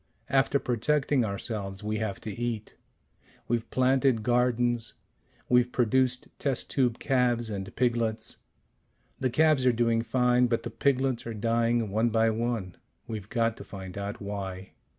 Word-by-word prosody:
After 135 +1 +3
protecting 135 +2 +1
ourselves 100 -1 -4
we 105 +1 -1
have 110 -3 -3
to 110 - -5
eat. 115 -1 -4 0.7
We've 115 -1 -1
planted 130 -2 +2
gardens. 120 -1 +1 0.5
We've 125 0 +3
produced 125 +1 +1
test 135 -4 -2
tube 125 -4 +1
calves 120 -3 +1
and 95 -1 -5
piglets. 120 -3 0 0.8
The 130 - +1
calves 150 +1 +4
are - - +7
doing 115 -1 +2
fine, 125 +1 +3
but 115 -1 0
the 120 - -5
piglets 130 0 0
are 115 - -4
dying 115 0 +1
one 110 +3 +2
by 115 0 +3
one. 110 -5 -2 0.3
We've 105 -2 -6
got 115 -2 +1
to - - -8
find 95 -2 -9
out 100 0 -4
why. 95 -2 -5
115 Hz, 145 wpm, -28 LUFS, 110-125 Hz, 0.8 s, are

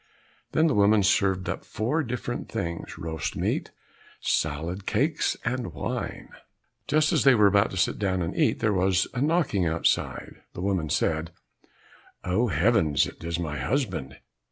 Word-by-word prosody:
Then 160 - +4
the 155 - +3
woman 105 0 +4
served 95 -1 +2
up 95 - -3
four 125 +10 -1
different 120 -2 -4
things, 85 -6 -4
roast 80 -1 -4
meat, - - -1 0.5
salad, 80 +6 -2
cakes, 140 +10 +1
and 120 -9 -2
wine. 70 - -4 0.6
Just 155 +3 +2
as 155 - +3
they 135 -2 +6
were 105 -2 +5
about 100 +1 +4
to 95 - -6
sit - - +1
down 95 -3 0
and 85 - -4
eat, - - +1
there 105 -2 +2
was 95 0 +2
a 120 - -2
knocking 145 - +1
outside. 80 +1 -1
The - - -5
woman 95 -5 -1
said, 80 +2 0 0.9
"Oh, 95 +7 +1
heavens! 85 - +3
It - - -10
is 85 0 -2
my 75 -4 -3
husband!" 80 - -2
95 Hz, 155 wpm, -26 LUFS, 85-120 Hz, 0.9 s, they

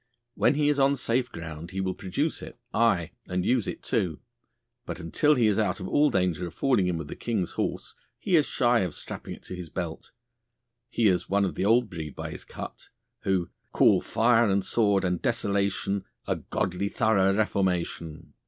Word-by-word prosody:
When 145 - +3
he 145 0 +2
is 145 -1 +1
on 140 +1 +4
safe 125 -1 0
ground 80 0 -7
he 95 0 -5
will 95 -1 -1
produce 140 - -2
it, - - -9 0.2
aye, 110 -8 +2 0.2
and 90 0 -1
use 125 -4 +2
it - - -5
too, 90 -9 -1 0.6
but - - -6
until 145 - +2
he 120 -4 +3
is 105 -1 +3
out 110 0 0
of 95 - -5
all 150 0 +4
danger 90 - 0
of - - -11
falling 120 -9 +2
in 90 -2 0
with 80 -2 -5
the - - -7
King's 110 -7 -2
horse - - -3 0.2
he 185 - +1
is 155 -3 +4
shy 120 -1 +3
of 90 -6 -2
strapping - - -6
it - - -18
to 90 - -7
his 90 -2 -7
belt. 85 -3 -5 0.8
He 120 -2 +2
is 90 -3 +1
one 100 +1 +3
of 95 - -2
the 95 - -1
old 115 +3 +4
breed 80 -6 -7
by - - -5
his - - -8
cut, - - -9 0.4
who: 95 -3 0 0.2
"Call - - +5
fire 115 0 +3
and 100 0 +1
sword 100 -4 +2
and 90 -1 -1
desolation, 100 -3 0 0.2
A - - -1
godly 95 +2 -2
thorough 100 -4 +3
reformation." 90 -6 -1
100 Hz, 195 wpm, -27 LUFS, 90-115 Hz, 0.8 s, Call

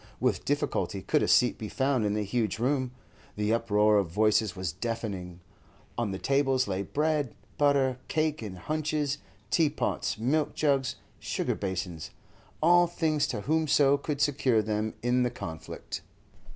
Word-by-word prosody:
With - - 0
difficulty - - -1
could - - +2
a - - +1
seat 125 - +4
be 110 - -5
found 130 -4 +1
in 105 - 0
the 105 - 0
huge 110 +1 -1
room; 130 +2 0 0.5
the 105 +1 +1
uproar 105 -2 +3
of 95 -4 -1
voices 105 +1 +2
was 95 -4 -2
deafening. 95 -3 -4 0.5
On 120 -3 -1
the 95 - -3
tables 135 0 +2
lay 95 -1 -1
bread, 150 +2 0 0.2
butter, 140 -3 +3
cake 155 -2 0
in 105 -4 -6
hunches, 150 - -1 0.3
tea 160 -3 +4
pots, 145 - -2
milk 140 +7 0
jugs, 140 -4 +1 0.2
sugar - - -1
basins—all 95 - -1
things 160 -3 0
to 110 -5 -3
whomso 145 -1 +3
could 145 0 -3
secure 130 -6 +2
them 110 +1 -2
in 125 +1 +2
the 125 - +2
conflict. 80 -9 -7
125 Hz, 150 wpm, -28 LUFS, 105-145 Hz, 0.5 s, seat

